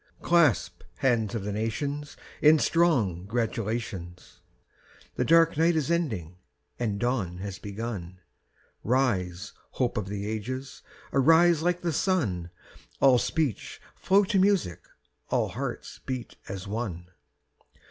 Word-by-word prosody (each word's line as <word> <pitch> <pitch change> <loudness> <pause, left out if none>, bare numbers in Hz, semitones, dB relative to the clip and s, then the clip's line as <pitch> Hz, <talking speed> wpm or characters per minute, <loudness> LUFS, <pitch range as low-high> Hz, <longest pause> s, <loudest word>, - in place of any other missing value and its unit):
Clasp 170 -8 +3
hands 115 -4 +1
of 110 - -3
the 105 - -3
nations 140 +8 -3 0.2
In 155 +1 +7
strong 125 - +2
gratulations: 110 -6 -4 0.7
The - - 0
dark 165 -1 +4
night 165 +1 +3
is 155 0 0
ending 105 - -2 0.4
and 105 -4 -1
dawn 110 -8 -1
has 95 0 -6
begun; 100 -4 -6 0.6
Rise, 105 -7 0 0.2
hope 125 -2 -1
of 105 -3 -2
the 100 0 -4
ages, 130 +5 -5 0.3
arise 160 +4 +5
like 175 +1 0
the 170 -2 -1
sun, 115 - 0 0.5
All 130 -3 +6
speech 145 - -2
flow 200 +2 +3
to 195 0 +1
music, 190 - +1 0.4
all - - +1
hearts - - -5
beat 130 -3 -5
as 95 0 -6
one! 95 -5 -4
120 Hz, 120 wpm, -27 LUFS, 100-155 Hz, 0.7 s, In